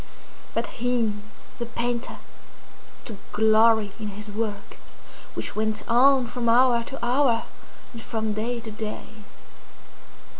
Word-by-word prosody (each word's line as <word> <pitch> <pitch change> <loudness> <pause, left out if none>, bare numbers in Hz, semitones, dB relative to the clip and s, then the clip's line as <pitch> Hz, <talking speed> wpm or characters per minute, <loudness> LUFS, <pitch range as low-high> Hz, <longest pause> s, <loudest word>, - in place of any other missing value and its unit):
But - - +1 0.2
he, 240 -3 +1 0.5
the 235 - -3
painter, 235 0 -3 0.9
took 220 -5 -7
glory 220 -1 +4
in 215 - -4
his 210 +1 -7
work, 205 -1 -4 0.6
which - - -4
went 215 0 -1
on 255 +2 +5
from 235 0 -2
hour 240 0 +5
to 270 -2 -5
hour, 245 -2 +3 0.5
and 230 - -8
from 220 -2 -2
day 235 +3 -2
to 220 -1 -7
day. 215 0 -6
230 Hz, 120 wpm, -25 LUFS, 215-245 Hz, 0.9 s, on